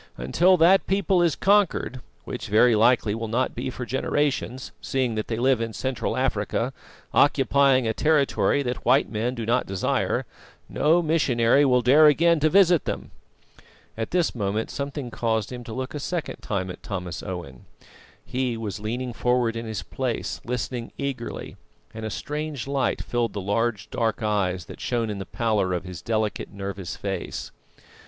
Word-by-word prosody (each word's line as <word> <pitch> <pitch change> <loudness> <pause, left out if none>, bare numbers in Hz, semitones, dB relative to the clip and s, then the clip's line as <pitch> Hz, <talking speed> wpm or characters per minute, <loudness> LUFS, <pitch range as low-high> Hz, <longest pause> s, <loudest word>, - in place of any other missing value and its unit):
Until 175 - +3
that 180 +4 +5
people 195 -1 +2
is 170 -4 +2
conquered 195 -10 +2 0.2
which - - -6
very 115 +3 +5
likely 110 -1 +3
will 115 +1 -3
not 125 +4 0
be 130 +2 -4
for 125 -1 -5
generations, 130 -1 -1
seeing 130 -3 -1
that 110 -1 -3
they 110 - -2
live 125 0 +2
in 115 -1 -3
Central 130 +2 -2
Africa, - - -1 0.4
occupying 140 -2 +4
a 110 - +1
territory 145 0 +2
that 125 -1 -3
white 130 +3 +3
men 115 +3 -1
do 115 -2 -4
not 120 +3 +1
desire 95 -1 0 0.4
no 170 +3 +2
missionary 140 -5 +3
will 125 -2 +3
dare 145 +5 +7
again 165 +3 +4
to 155 +1 +3
visit 180 -2 +5
them." - - -4 0.8
At 115 0 -3
this 175 -2 +1
moment 105 -1 -2
something 140 -3 -4
caused 110 -2 -1
him 125 -1 -6
to 115 - -8
look 130 +3 -4
a 150 - -4
second 170 +3 -3
time 95 -4 -3
at - - -11
Thomas 90 -4 -5
Owen. 85 -9 -7 0.6
He 125 -2 -2
was 110 -3 -4
leaning 120 +4 -3
forward 125 -1 +1
in 115 0 -5
his 110 -1 -4
place 130 -3 -3
listening 125 0 -4
eagerly, 135 -4 -5 0.4
and 110 0 -5
a - - -4
strange 150 +2 -4
light 140 -1 -1
filled 120 -2 -1
the 100 - -3
large, 105 +2 -1
dark 115 -2 -1
eyes 95 -4 0
that - - -11
shone 115 -3 -1
in 100 - -5
the 95 - -6
pallor 110 -6 0
of 90 - -2
his 90 -3 -8
delicate, 110 -2 -2
nervous 100 -2 -5
face. 95 -3 -5
120 Hz, 170 wpm, -25 LUFS, 110-140 Hz, 0.8 s, dare